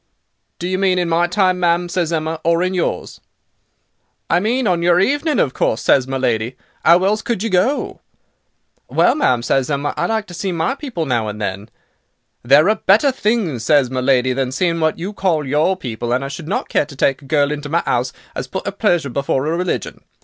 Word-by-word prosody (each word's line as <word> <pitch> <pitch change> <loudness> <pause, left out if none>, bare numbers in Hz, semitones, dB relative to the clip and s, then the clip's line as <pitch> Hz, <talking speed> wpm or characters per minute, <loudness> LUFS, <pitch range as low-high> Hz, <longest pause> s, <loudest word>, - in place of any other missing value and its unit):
"'Do 175 - -4
you 185 0 -1
mean 190 -2 +2
in 175 -1 0
my 170 +1 +2
time, 185 0 +1
ma'am,' 175 0 +1
says 175 -2 -1
Emma, 160 0 -2
'or 170 +1 +2
in 185 +1 -1
yours.' 180 -2 -3 1.1
"'I 170 - +4
mean 240 +6 0
on 180 -4 +1
your 175 +1 +4
evening 290 - +1
of 135 -9 +1
course,' 110 - 0
says 130 -2 +3
my 135 0 -2
lady. 120 -1 -1 0.3
''Ow 175 +2 +5
else 210 +3 +1
could 230 -4 -2
you 225 - -2
go?' 190 +11 0 0.9
"'Well, - - +3
ma'am,' 125 - +1
says 135 +2 0
Emma, 145 0 -1
'I - - -1
like 220 -2 -1
to 180 - -12
see 190 +2 -3
my 165 +3 0
people 260 - -5
now 120 -5 0
and 105 0 -6
then.' 100 +1 -4 0.7
"'There 140 +7 +5
are 215 - +3
better 225 +9 +4
things,' 210 - -1
says 135 0 +3
my 130 -1 -2
lady, 130 -1 +2
'than 130 -1 -2
seeing 170 +2 0
what 160 -1 +1
you 185 +5 -5
call 170 -7 0
your 150 +7 +1
people, 120 -6 -5
and 130 +2 0
I - - -5
should 150 +3 -8
not 195 - -2
care 145 - 0
to 145 - -12
take 135 +1 +1
a - - -15
girl 145 0 +1
into 145 -1 -5
my 170 +3 +1
'ouse 125 +1 0 0.2
as 130 - -5
put 190 +10 -5
'er - - -1
pleasure 175 - 0
before 140 0 -1
'er 160 +2 0
religion. 180 +1 -3
165 Hz, 215 wpm, -18 LUFS, 135-185 Hz, 1.1 s, Ow